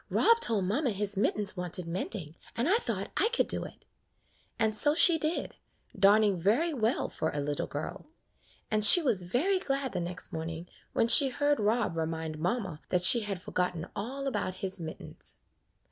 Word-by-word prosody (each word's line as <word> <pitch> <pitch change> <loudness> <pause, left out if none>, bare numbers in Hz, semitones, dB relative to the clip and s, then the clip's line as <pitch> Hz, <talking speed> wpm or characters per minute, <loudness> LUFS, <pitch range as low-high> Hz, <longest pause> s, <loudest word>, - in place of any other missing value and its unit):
"Rob 465 0 +3
told 220 - +3
mamma 250 +9 -1
his 205 -1 -2
mittens 205 0 +2
wanted 180 -1 -4
mend 180 +6 -3
ing, 160 -5 -9 0.2
and 235 +5 -1
I 400 +6 +3
thought - - -5
I 445 - +3
could 475 - -1
do - - 0
it;" - - -14 0.7
and 220 -1 -1
so 295 +6 +4
she 335 -1 +6
did, 310 +3 -3 0.4
darning 205 -1 +3
very 240 - 0
well 230 -2 -1
for 160 - -4
a 145 - -5
little 145 0 -4
girl; 145 - -8 0.6
and 215 -1 0
she 215 - +11
was 245 - 0
very 285 - -1
glad 275 -5 -3
the - - -4
next 175 +1 -6
morning 165 +1 -7 0.3
when 230 - +1
she 270 +3 +7
heard 290 +3 -1
Rob 215 -3 -1
remind 160 -1 -5
mamma 180 -2 -4
that 180 -1 0
she 235 +6 +6
had 205 -4 -5
for - - -10
gotten 180 -2 -2
all 265 +7 -6
about 205 -8 -3
his 190 0 -5
mittens. 160 -1 -8
210 Hz, 185 wpm, -28 LUFS, 180-265 Hz, 0.7 s, she